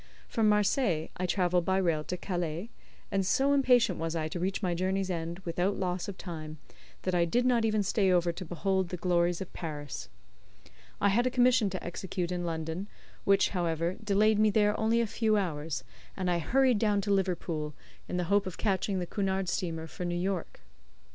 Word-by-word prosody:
From 220 -3 +2
Marseilles 205 - +2
I 180 - -1
travelled 180 -2 +2
by 190 +2 +1
rail 165 -5 +1
to 180 - -3
Calais, 175 +3 -3 0.4
and 195 -1 +1
so 270 +9 +2
impatient 255 -4 +4
was 165 0 -2
I 160 -1 -1
to 175 - -4
reach 190 +3 -2
my 180 -2 +1
journey's 190 +2 -1
end 170 0 -3
without 180 +4 0
loss 180 0 -2
of 200 -2 -6
time, 155 -4 -7 0.5
that 185 - -1
I 175 -1 +3
did 240 +9 +1
not 240 -3 +3
even 215 -1 +2
stay 195 -1 +2
over 175 -1 +3
to 175 +3 -7
behold 185 +2 -1
the 180 - -4
glories 175 0 +1
of 190 - -7
Paris. 145 - -6 0.9
I 200 - +3
had 240 +5 +3
a - - +3
commission 250 -3 +4
to 185 -1 -5
execute 175 0 -3
in 175 -1 -2
London, 165 +3 -3 0.4
which, 195 0 +4
however, 170 -1 -1
delayed 210 +1 +3
me 215 0 +5
there 210 0 +3
only 225 +1 +3
a - - +1
few 220 0 +1
hours, 155 -7 -2 0.3
and 185 -2 0
I 175 - +1
hurried 255 - +3
down 205 -2 +2
to 200 0 0
Liverpool, 170 -6 -1 0.3
in 180 - -3
the 180 - 0
hope 200 +3 +2
of 185 - -6
catching 195 -1 0
the 180 - -1
Cunard 190 -1 -1
Steamer 165 -3 -2
for 165 - -7
New 175 0 -1
York. 185 0 -3
185 Hz, 195 wpm, -30 LUFS, 170-205 Hz, 0.9 s, me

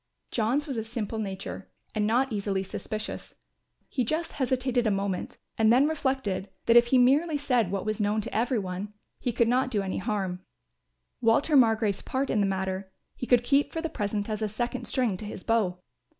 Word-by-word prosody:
John's 245 +6 +1
was 270 -5 -4
a 220 - -1
simple 225 -1 -3
nature 190 - -5 0.2
and 210 -1 +1
not 245 +3 +2
easily 200 -2 -1
suspicious; 215 +3 -6 0.5
he 255 - -1
just 315 +8 -1
hesitated 255 -2 0
a - - +4
moment 195 -2 -2 0.2
and 220 0 +5
then 260 +5 +5
reflected 265 -11 -1 0.2
that 230 - +4
if 240 0 +7
he 260 - +4
merely 290 +6 +4
said 250 -8 +1
what 195 0 -2
was 215 0 -1
known 210 +1 +1
to - - -7
every 235 +3 +1
one 195 +1 -4 0.3
he 245 - -1
could 235 0 +2
not 255 +2 +2
do 210 -5 0
any 190 - -2
harm. 190 -2 -2 0.8
Walter 245 +7 +3
Margrove's 225 -5 +4
part 265 +1 -2
in 215 - +2
the 200 - +3
matter, 190 0 -2 0.2
he 250 - -5
could 245 -1 +4
keep 280 +3 +2
for 325 - -3
the 325 0 -2
present 205 -3 -2
as 215 -1 -3
a 215 - 0
second 240 +3 -3
string 240 -8 0
to 210 - -7
his 205 -2 -7
bow. 210 -6 +1
225 Hz, 195 wpm, -27 LUFS, 200-255 Hz, 0.8 s, if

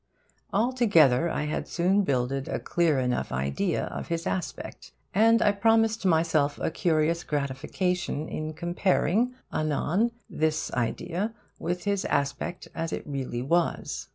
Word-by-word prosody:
Altogether, 200 - +4
I 155 - -1
had 150 - -3
soon 185 +4 +2
builded 135 -4 -1
a - - -1
clear 165 -5 +1
enough 125 -1 -1
idea 70 +2 -1
of - - -6
his 170 0 -2
aspect; 185 - -5 0.2
and 225 +2 +5
I 205 - +5
promised 225 0 +2
myself 160 -4 +2
a - - -1
curious 165 0 +1
gratification 150 +3 -2
in 155 0 -4
comparing 185 +7 +1 0.2
anon 155 +8 +1 0.2
this 155 0 -1
idea 175 - -2 0.2
with 175 0 -2
his 200 -1 0
aspect 140 +5 -2
as 165 0 -3
it - - -4
really 130 -4 -3
was. 170 +5 0
165 Hz, 130 wpm, -27 LUFS, 145-195 Hz, 0.2 s, and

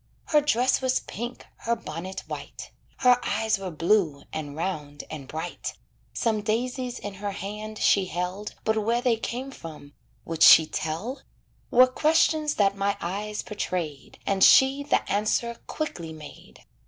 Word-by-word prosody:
Her 300 -1 +5
dress 255 -3 +2
was 260 0 +1
pink, 240 +3 -7
her 235 0 -1
bonnet 180 0 -6
white. - - -8 0.3
Her 250 -1 +5
eyes 220 0 0
were 190 -1 -4
blue, 165 -3 +1
and 145 -2 -5
round, 150 -4 -4
and 145 -4 -7
bright, 160 +5 -5 0.4
Some 220 -3 0
daisies 245 +4 -2
in 205 - -6
her 200 +1 -4
hand 210 +2 -6
she 195 -2 +3
held 180 +4 -4
But 220 -1 +1
where 235 +3 +1
they 245 -3 +3
came 250 +4 -5
from 155 - -10 0.3
would 165 -1 -5
she 160 - +9
tell? 195 - -4 0.5
Were 255 -1 +7
questions 305 +2 +2
that 195 -1 +3
my 200 +1 0
eyes 205 +4 -4
portrayed, 175 -9 -4
And 195 -1 +2
she 270 +1 +7
the 285 - 0
answer 215 +3 0
quickly 170 - -4
made. 155 -1 -13
210 Hz, 150 wpm, -26 LUFS, 170-245 Hz, 0.5 s, she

